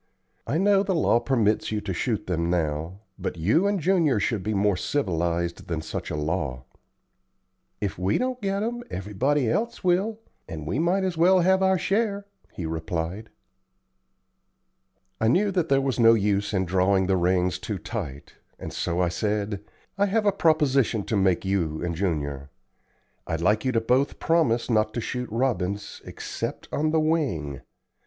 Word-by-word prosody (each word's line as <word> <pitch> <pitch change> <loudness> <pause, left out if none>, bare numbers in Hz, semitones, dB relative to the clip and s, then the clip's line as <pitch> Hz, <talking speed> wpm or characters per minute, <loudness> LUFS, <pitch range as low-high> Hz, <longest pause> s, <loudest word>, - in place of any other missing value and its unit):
I 150 - 0
know 195 +2 +4
the 195 -2 0
law 150 -7 +3
permits 115 -6 +1
you 105 - 0
to 100 -2 -4
shoot 110 +5 -1
them 85 -2 -1
now, 85 +2 -2 0.2
but - - -4
you 110 - +2
and 200 -1 +1
Junior 165 - +2
should 105 0 0
be 105 +3 -2
more 100 0 +2
civilized 85 - -1
than 80 -2 -3
such - - -5
a - - -3
law." 75 -5 -2 1.2
"If 100 -3 -3
we 95 +2 +1
don't 255 0 -2
get 195 0 -1
'em, 240 +2 -3
everybody 120 +8 0
else 225 - -1
will, 195 +5 +1 0.3
and 80 -2 -6
we 95 - -1
might 180 +4 +2
as 185 -3 -2
well 180 +3 +5
have 190 +2 +3
our 190 0 +3
share," 200 +2 0 0.3
he 85 - -6
replied. 80 +6 -4 1.9
I 110 - +2
knew 195 - +3
that 175 -4 0
there 135 0 +4
was 135 -2 -1
no 115 0 +7
use 100 -1 0
in 95 -3 0
drawing 95 +2 +2
the 95 +1 +2
reins 90 0 +1
too 105 - -4
tight, 80 - -6 0.2
and - - -7
so 85 +1 -1
I 90 - +2
said: 105 +1 -2 0.4
"I 200 - +4
have 215 +2 +1
a 205 - +5
proposition 140 - +2
to 110 - -2
make 95 -3 +2
to - - -7
you 85 -5 -1
and 85 -1 -1
Junior. 70 -6 -2 0.8
I'd 80 - -2
like 105 +6 +2
you 130 - +2
both 125 +4 +2
to - - -15
promise 145 -9 +1
not 110 -2 +1
to - - 0
shoot 125 +2 -4
robins 105 -5 -2
except - - -5
on 155 +1 +1
the 160 +1 +2
wing. 135 - -1
110 Hz, 175 wpm, -25 LUFS, -, 1.9 s, no